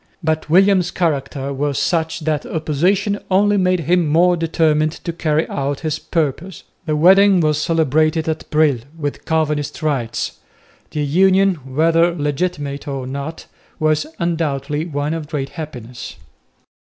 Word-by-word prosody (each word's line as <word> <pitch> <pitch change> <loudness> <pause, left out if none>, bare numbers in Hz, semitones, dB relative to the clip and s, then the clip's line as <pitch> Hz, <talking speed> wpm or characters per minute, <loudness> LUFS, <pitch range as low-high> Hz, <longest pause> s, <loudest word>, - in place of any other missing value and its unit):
But 155 -1 -1
William's 185 +1 +4
character 140 -5 -2
was 140 0 -1
such 160 -1 0
that 155 -1 -1
opposition 185 +7 0
only 205 +2 +3
made 185 -2 +2
him 170 +1 +2
more 175 +4 +4
determined 155 -2 +1
to 170 - -6
carry 160 -1 0
out 140 0 -3
his 155 -1 -2
purpose. 165 +3 -3 0.2
The 155 - +1
wedding 190 +4 +6
was 155 -2 +1
celebrated 155 0 +1
at 160 -1 -3
Brill 150 -5 +3 0.2
with 145 -3 -4
Calvinist 155 -1 -1
rites. 135 -7 -2 0.5
The 150 - -3
union, 190 +5 +4 0.2
whether 165 +2 +3
legitimate 145 -2 -3
or 135 -2 -4
not, 140 +5 -6 0.3
was 155 0 +1
undoubtedly 155 -2 -2
one 145 -1 -2
of 160 -2 -5
great 145 -3 -3
happiness. 125 -7 -8
155 Hz, 135 wpm, -19 LUFS, 145-170 Hz, 0.5 s, wedding